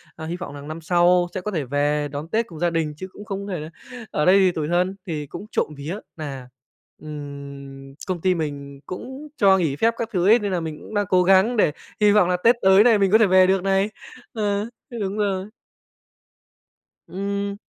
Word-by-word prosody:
à, 160 - -7
hy 170 +2 -3
vọng 175 -5 -7
rằng 145 +1 -9
năm 160 +1 -6
sau 175 +1 +3
sẽ 185 - -3
có 210 - -4
thể 160 -6 -1
về 145 +2 0
đón 145 +3 -5
Tết 225 +5 0
cùng 160 -3 -11
gia 175 0 +2
đình, 160 -3 -1
chứ 185 - -6
cũng 205 - -11
không 200 -1 -5
có 195 - -4
thể 170 - -3
là 155 +1 -7 0.4
ở 150 - 0
đây 190 +2 +6
thì 185 -2 +4
tủi 155 -3 -3
thân. 180 +3 +1
Thì 150 -4 -4
cũng 205 - -8
trộm - - 0
vía 155 +7 -5 0.2
nà, 135 -5 -7 0.5
ừm, 140 -2 -9
công 180 -3 -3
ty 185 -1 +2
mình 140 -3 -5
cũng 265 +10 -8
cho 195 -1 +5
nghỉ 160 -6 0
phép 225 +8 +2
các 230 -1 -3
thứ 180 +1 +1
ấy, 225 +3 +6
nên 205 -3 -3
nà 180 - 0
mình 160 -2 -5
cũng - - -11
đang 205 -1 +1
cố 180 -1 +4
gắng 195 +6 +4
để 155 - +4 0.3
hy 210 - +6
vọng 205 -4 +4
là 180 - +2
Tết 235 +1 +6
tới 190 +2 +6
này 230 -3 +5
mình 195 -1 +2
có 220 - +7
thể 220 -3 +4
về 185 0 +5
được 190 -1 +2
này, 195 +1 +2 0.4
ờ, 205 -1 -1 0.2
th 245 - -15
đúng 200 +1 -3
rồi. 195 -2 -1 1.6
Ừm. 200 +1 -3
180 Hz, 225 wpm, -23 LUFS, 150-200 Hz, 1.6 s, có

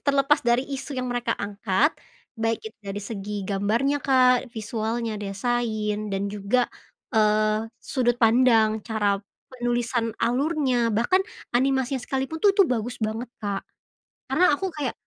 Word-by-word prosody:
terlepas 280 +1 +3
dari 240 +2 +2
isu 275 -1 -5
yang 255 - -2
mereka 245 -1 -1
angkat, 200 - +1 0.4
baik 225 0 0
itu 220 - -9
dari 200 0 -5
segi 205 0 -6
gambarnya, 230 +9 0
Kak, 255 -1 +4
visualnya, 225 +1 -3
desain, 215 0 -1
dan 195 0 -1
juga, 205 +5 0 0.5
eee, 215 0 +2
sudut 245 -2 0
pandang, 225 -2 +4
cara 205 -3 0 0.3
penulisan 240 -1 0
alurnya, 255 -2 +1
bahkan 240 - +2 0.3
animasinya 265 0 +1
sekalipun 270 +5 -3
tuh 410 - +7
tuh 395 - +7
bagus 245 -2 -2
banget, 220 +2 -3
Kak. 200 -2 -2 0.7
Karena 365 -3 +4
aku, 380 +7 -1
kayak, 280 -5 -2
235 Hz, 130 wpm, -25 LUFS, 215-255 Hz, 0.7 s, tuh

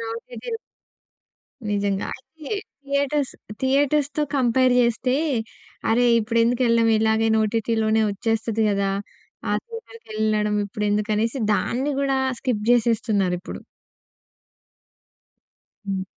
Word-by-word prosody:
ఓటీటీలు 245 - -6 1.1
నిజంగా. 200 -1 0
అయితే 305 +3 -13 0.4
థియేటర్స్ 280 0 0 0.3
థియేటర్స్‌తో 285 +2 +2
కంపేర్ 255 0 +3
చేస్తే, 245 +2 +1 0.7
అరే! 245 +2 +3
ఇప్పుడెందుకెళ్ళడం? 230 +1 +2
ఇలాగే 220 0 +2
ఓటిటీలోనే 220 0 +1
వచ్చేస్తది 225 +1 -1
కదా! 200 -1 +1 0.6
ఆ - - +2
థియేటర్‌కి 460 - -11
వెళ్ళడం 210 -1 +1
ఇప్పుడెందుకనేసి 210 +4 -1
దాన్ని 265 +7 0
కూడా 270 -1 +1 0.2
స్కిప్ 225 -5 -1
చేసేస్తున్నారిప్పుడు. 210 -6 +1 2.3
హ్మ్. 195 -1 -2
230 Hz, 80 wpm, -23 LUFS, 215-260 Hz, 2.3 s, కంపేర్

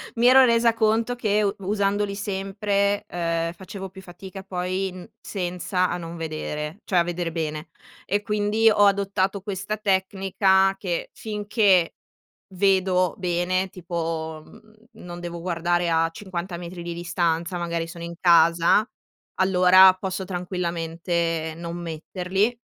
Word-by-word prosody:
Mi 235 +1 +3
ero 260 +1 +8
resa 235 -1 +3
conto 225 +2 +1
che 215 -3 +1
u 200 -1 +1
usandoli 200 +1 0
sempre, 200 +1 -1
ehm, 165 -2 -2
facevo 190 +2 -8
più 190 +1 -12
fatica 190 +1 -10
poi 185 0 -2
n 185 +4 -11
senza 180 -1 -2
a 175 - -2
non 170 -1 -7
vedere, 155 +2 -5
cioè 185 - 0
a 170 - +5
veder 175 0 -3
bene 155 -1 -4 0.4
e 205 +2 0
quindi 210 +2 +2
ho 205 -1 +4
adottato 200 -1 +1
questa 200 +2 -4
tecnica 195 -1 +2
che, 175 -4 -3
finché 205 -4 +1 0.6
vedo 185 -2 +2
bene, 185 +1 0
tipo, 165 -3 -4
mhmm, 215 0 -18 0.3
non 175 0 -7
devo 170 -1 -6
guardare 175 0 0
a 165 0 +2
50 180 -1 -6
metri 175 0 -8
di 170 0 -4
distanza, 170 0 -1
magari 170 -1 -2
sono 170 0 -9
in 170 0 -6
casa, 170 +4 +4 0.5
allora 185 0 +7
posso 190 0 -4
tranquillamente 170 -2 -2
non 170 0 -6
metterli. 180 +6 -2
185 Hz, 135 wpm, -24 LUFS, 170-200 Hz, 0.6 s, ero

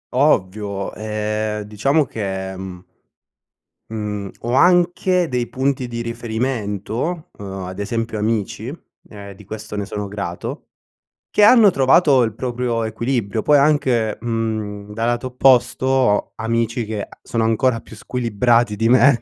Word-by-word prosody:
Ovvio, 100 -7 +1
ehm, 105 0 -2
diciamo 135 +9 +1
che, 95 -5 -4
mhmm 95 -1 -8 1.1
mhmm 105 -2 -4
ho 120 +1 -2
anche 180 +3 +3
dei 125 -3 -1
punti 130 -1 -1
di 115 -1 -4
riferimento, 115 - -3
uhm, 95 -2 -6
ad 95 +2 -7
esempio 115 +2 -2
amici, 110 +3 -2 0.4
e 100 -2 -10
di 105 - -14
questo 110 +1 -7
ne 100 -1 -2
sono 105 0 -5
grato, 100 -4 -5 0.6
che 210 - +3
hanno 220 -1 +8
trovato 135 -2 +4
il 110 -2 -1
proprio 120 -1 -2
equilibrio. 110 -1 -1
Poi 150 - +5
anche, 130 -7 +2
mhmm, 110 -3 -3
dal 115 +2 -2
lato 120 +1 -1
opposto 125 0 +3
ho 130 -5 +2
amici 115 +1 -1
che 105 -1 -4
a - - -11
sono 115 -1 -1
ancora 115 +2 +2
più 110 - -13
squilibrati 115 0 +1
di 115 +2 +1
me. 130 0 +5
115 Hz, 135 wpm, -20 LUFS, 105-130 Hz, 1.1 s, hanno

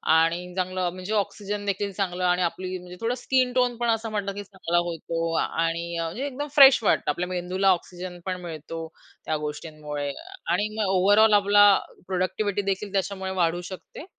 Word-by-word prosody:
आणि 170 +2 +1
चांगलं 185 -1 -1
म्हणजे 185 +3 -5
ऑक्सिजनदेखील 205 -1 -2
चांगलं 185 -2 -2
आणि 180 0 +2
आपली 185 +1 -2
म्हणजे 180 0 -11
थोडं 230 +2 0
स्किन 255 -1 +2
टोन 250 -1 +2
पण 240 0 0
असं 225 0 0
म्हणलं 205 -2 -2
की 205 - -5
चांगला 190 -3 -2
होतो 165 0 -3
आणि 165 +1 -2
म्हणजे 165 +11 -3
एकदम 285 +1 -4
फ्रेश 270 -3 +9
वाटतं. - - +3
आपल्या 180 +4 -3
मेंदूला 185 +2 0
ऑक्सिजन 180 0 -4
पण 185 -1 -3
मिळतो 165 -1 -6 0.4
त्या 155 - 0
गोष्टींमुळे 150 -1 -5 0.4
आणि 205 - +1
मग 220 - +1
ओव्हरऑल 205 +4 +5
आपला 205 0 +6 0.4
प्रॉडक्टिव्हिटी 190 +2 -1
देखील 195 +1 -4
त्याच्यामुळे 190 -1 -2
वाढू 175 -2 +1
शकते 185 - -9
185 Hz, 160 wpm, -25 LUFS, 175-205 Hz, 0.4 s, फ्रेश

